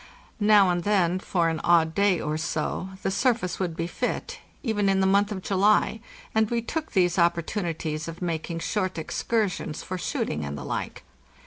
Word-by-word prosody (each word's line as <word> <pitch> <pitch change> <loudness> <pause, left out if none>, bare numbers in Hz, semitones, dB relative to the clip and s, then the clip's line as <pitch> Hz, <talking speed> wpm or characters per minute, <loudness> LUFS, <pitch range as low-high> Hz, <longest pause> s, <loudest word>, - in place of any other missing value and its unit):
Now 205 -3 +6
and 175 -1 -1
then 185 -3 +2
for 175 -3 0
an 160 -1 -1
odd 165 -2 +4
day 200 -1 +3
or 150 0 -2
so 160 +3 -2
the - - 0
surface 220 -4 0
would 175 -4 -2
be 165 - -1
fit, 475 - -3 0.2
even 210 -5 +1
in 195 0 +3
the 190 - +3
month 200 +2 +3
of 190 -3 -4
July, 205 +3 +3 0.3
and 220 -1 +2
we 235 - +1
took 315 +5 -4
these 180 -1 +2
opportunities 170 -2 0
of 165 0 -7
mak 165 -3 -3
ing 170 - -3
short 185 +1 -2
excursions 185 0 -2
for 185 0 -5
shooting 75 - -2
and 70 0 -4
the 70 - -7
like. - - -4
185 Hz, 185 wpm, -26 LUFS, 165-205 Hz, 0.3 s, Now